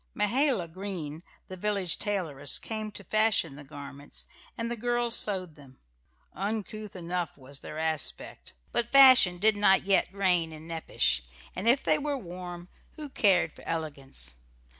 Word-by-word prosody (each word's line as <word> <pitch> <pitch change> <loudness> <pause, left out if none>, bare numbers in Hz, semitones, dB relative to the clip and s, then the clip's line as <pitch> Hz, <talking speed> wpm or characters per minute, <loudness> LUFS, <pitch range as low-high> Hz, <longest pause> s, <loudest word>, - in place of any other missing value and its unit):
Mahala 230 - +1
Green, 165 -4 -6 0.3
the 185 - -7
village 195 -2 0
tailoress, 160 -9 0
came 215 -1 -4
to 205 - -9
fashion 215 -9 +2
the 145 - -10
garments, 140 0 -8 0.3
and 230 0 -3
the - - -1
girls 240 0 +1
sewed 185 -5 +1
them. 140 -3 -17 0.6
Uncouth 210 +1 -4
enough 175 -2 -3
was 135 0 -6
their 155 - -8
aspect; 160 - -3 0.2
but 235 0 -1
fashion 255 -10 +8
did 215 +4 +3
not 205 -2 +4
yet 195 -2 +2
reign 180 -4 +1
in 155 +1 -10
Nepash, 65 - 0 0.3
and 190 +5 -3
if 255 +4 +4
they - - +3
were 290 -1 -2
warm, 175 -4 -8 0.3
who 300 -2 -8
cared 180 -10 +3
for - - -15
elegance? 140 - -4
185 Hz, 150 wpm, -29 LUFS, 160-215 Hz, 0.6 s, fashion